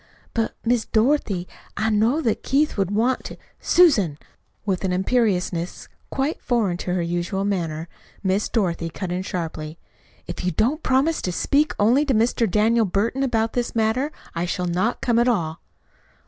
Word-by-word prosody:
"But, 225 -1 -1
Miss 235 -1 +2
Dorothy, 220 -6 +1 0.3
I 220 +1 +1
know 225 +9 +2
that 225 -7 0
Keith 295 +3 +1
would 195 -3 0
want 230 +5 0 0.2
" - - -39
"Susan!" 220 - +4 0.5
With 190 -3 -1
an 190 - 0
imperiousness 185 -3 0 0.2
quite 275 +4 -2
foreign 220 -8 0
to 180 0 -2
her 175 - 0
usual 175 +3 -2
manner, 165 -5 -2 0.4
Miss 195 +2 +1
Dorothy 170 -6 0
cut 180 +2 -5
in 180 +1 -1
sharply. 160 -4 -5 0.5
"If 175 - -6
you 180 - +1
don't 255 - +1
promise 275 +5 +2
to 180 - -2
speak 290 - +1
only 235 +8 +4
to 270 -4 +1
Mr. 230 0 +2
Daniel 220 +3 +3
Burton 210 +8 0
about 225 -4 +1
this 245 -1 -2
matter 230 +6 +1 0.2
I 170 +1 -1
shall 180 +1 -2
not 180 +7 0
come 235 -2 +2
at 240 - +3
all." 165 -9 0
215 Hz, 165 wpm, -23 LUFS, 180-245 Hz, 0.5 s, Susan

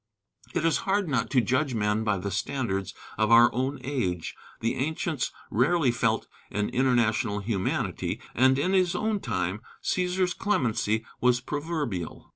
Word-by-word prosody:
It 160 - +1
is 165 -3 +3
hard 200 -1 +2
not 125 -6 0
to 130 - +4
judge 130 +2 0
men 105 0 +1
by 105 -2 +1
the 100 +2 -4
standards 95 -2 -2 0.2
of 110 -1 +3
our 115 +1 +7
own 130 +4 -1
age. 95 - -2 0.2
The 115 - 0
ancients 155 0 -1 0.2
rarely 135 +4 +3
felt 120 - 0 0.2
an 105 +1 -1
international 120 -5 +2
humanity, 100 -2 -2
and 130 +2 +4
in 180 +7 +1
his 185 -2 +3
own 215 -1 0
time 95 - -2 0.2
"Cæsar's 180 0 +1
clemency" 115 - 0
was 125 -1 +3
proverbial. 145 - -4
125 Hz, 145 wpm, -27 LUFS, 105-155 Hz, 0.2 s, our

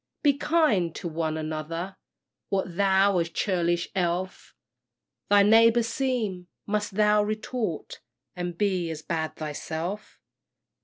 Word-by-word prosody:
Be 290 -2 +5
kind 285 - +2
to 180 - -5
one 160 -1 -2
another! 160 +4 -4 0.5
What 190 -3 -1
though 195 0 +3
a - - +3
churlish 175 0 0
elf 180 0 -2 0.7
Thy 205 0 +6
neighbour 230 +3 +6
seem! 230 -7 -2 0.2
Must 210 -1 -2
thou 210 0 +4
retort, 215 -3 -3 0.3
And 175 -1 -4
be 185 -4 0
as 160 -1 -6
bad 160 -2 -2
thyself? 160 +6 -5
190 Hz, 115 wpm, -26 LUFS, 170-210 Hz, 0.7 s, Thy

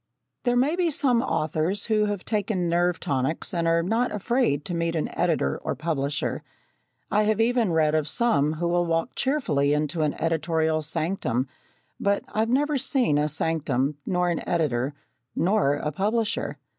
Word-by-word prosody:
There 245 0 +2
may 270 +7 +2
be 355 -2 +1
some 255 -5 +2
authors 160 -3 -1
who 215 -2 +2
have 205 -3 -3
taken 200 -4 -1
nerve 175 0 +1
tonics 135 +6 -2
and 170 -1 0
are 165 0 +3
not 225 +7 0
afraid 210 - 0
to 175 - -4
meet 170 0 -1
an 155 - -2
editor 70 - 0
or - - -3
publisher. 150 -2 -2 0.7
I 210 - +3
have 215 0 +1
even 230 -3 +2
read 155 -2 +2
of 155 -1 +1
some 155 -9 +2
who 170 +2 -2
will 175 0 +1
walk 165 +7 0
cheerfully 150 - +1
into 150 +2 -1
an 150 -1 0
editorial 160 -1 0
sanctum 155 -5 -1 0.5
but 200 0 +1
I've 220 +1 +1
never 285 +3 +2
seen 250 - +2
a 150 +1 +1
sanctum, 150 -3 0
nor 180 -1 +1
an 170 - -2
editor, 145 -5 0 0.4
nor 180 -5 +2
a 150 +1 -3
publisher. 215 +7 -1
170 Hz, 165 wpm, -25 LUFS, 150-215 Hz, 0.7 s, are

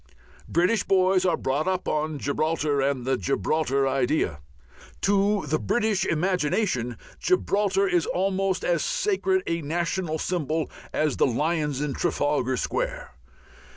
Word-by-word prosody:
British 180 +6 +2
boys 185 -1 +3
are - - +2
brought 140 +6 -1
up 185 -1 -1
on 155 0 -1
Gibraltar 145 0 0
and 135 -2 0
the 130 0 +1
Gibraltar 135 - 0
idea. 130 - 0 0.6
To 200 0 +2
the 155 +2 0
British 215 - 0
imagination 155 - 0 0.2
Gibraltar 200 - +1
is 175 -3 +1
almost 190 0 0
as 175 - +1
sacred 390 -6 0
a 165 0 -1
national 170 +1 -2
symbol 160 -2 -2 0.2
as 155 -3 0
the - - +4
lions 150 +2 0
in 150 -2 -1
Trafalgar 145 -6 0
Square. - - -3
165 Hz, 125 wpm, -25 LUFS, 145-195 Hz, 0.6 s, the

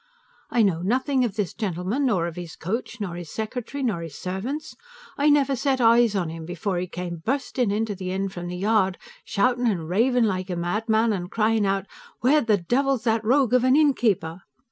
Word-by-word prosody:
I 235 - +3
know 175 -5 +1
nothing 255 +7 +1
of 220 -5 -2
this 205 -6 -2
gentleman, 205 - -1
nor 185 -8 +1
of 170 -1 -5
his 175 -3 -7
coach, 230 +6 -4
nor 195 -5 -3
his 175 -2 -7
secretary, 245 - -4
nor 215 -9 0
his 165 -4 -8
servants; 225 +12 -5 0.4
I 290 +1 +3
never 280 -2 +3
set 265 +1 0
eyes 230 -2 +5
on 175 -4 -1
him 165 0 -7
before 175 +2 -3
he 180 - -3
came 175 -1 -5
bursting 255 -1 -1
into 210 +1 -1
the 185 -1 -5
inn 195 +1 -1
from 175 -2 -7
the 180 0 -5
yard, 195 -1 +2 0.3
shouting 245 +3 +1
and 175 -8 -1
raving 235 +7 +2
like 190 -3 -1
a 180 - -2
madman, 220 +6 +1
and 180 -2 -4
crying 220 -1 +1
out, 195 0 0 0.4
"Where 290 +5 +4
the 220 -4 +2
devil's 255 +7 0
that 225 -1 +1
rogue 255 +2 +3
of 250 -1 +4
an 255 +1 +4
innkeeper?" 220 - +2
215 Hz, 200 wpm, -24 LUFS, 180-245 Hz, 0.4 s, eyes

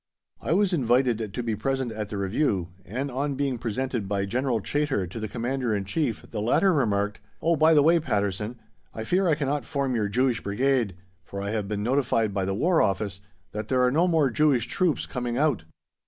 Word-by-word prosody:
I 155 - 0
was 195 0 +2
invited 120 - +1
to 125 - -4
be 115 -2 -1
present 130 +2 -1
at 105 -2 -5
the 105 - -4
review, 100 - 0 0.2
and 135 +7 -3
on 140 +2 -1
being 135 -3 -1
presented 120 -1 -2
by 100 0 0
General 120 +3 0
Chaytor 145 -3 -1
to 90 +6 -7
the 110 - -3
Commander 120 0 -1
in 100 -1 -2
Chief 120 - -2
the 105 - -3
latter 180 - +3
remarked, 105 -7 0 0.2
"Oh, 170 +1 +2
by 160 +1 +5
the 145 - +6
way, 165 +2 +5
Patterson, 105 - -2 0.4
I 110 - -4
fear 185 +10 +1
I 160 - +4
cannot 145 -2 -1
form 135 +1 -1
your 105 -4 0
Jewish 125 +1 +1
Brigade, 115 -1 0 0.3
for 100 +3 -7
I 100 +1 -3
have 105 -2 -2
been 105 0 -2
notified 115 -4 +1
by 95 -1 0
the 95 0 -1
War 170 - +3
Office 100 0 -1 0.3
that 105 0 -5
there 130 +1 +2
are 125 - +3
no 165 +6 +3
more 160 -6 +3
Jewish 140 -3 +3
troops 175 +3 0
coming 120 -1 -3
out." 135 - +1
120 Hz, 205 wpm, -26 LUFS, 105-140 Hz, 0.4 s, the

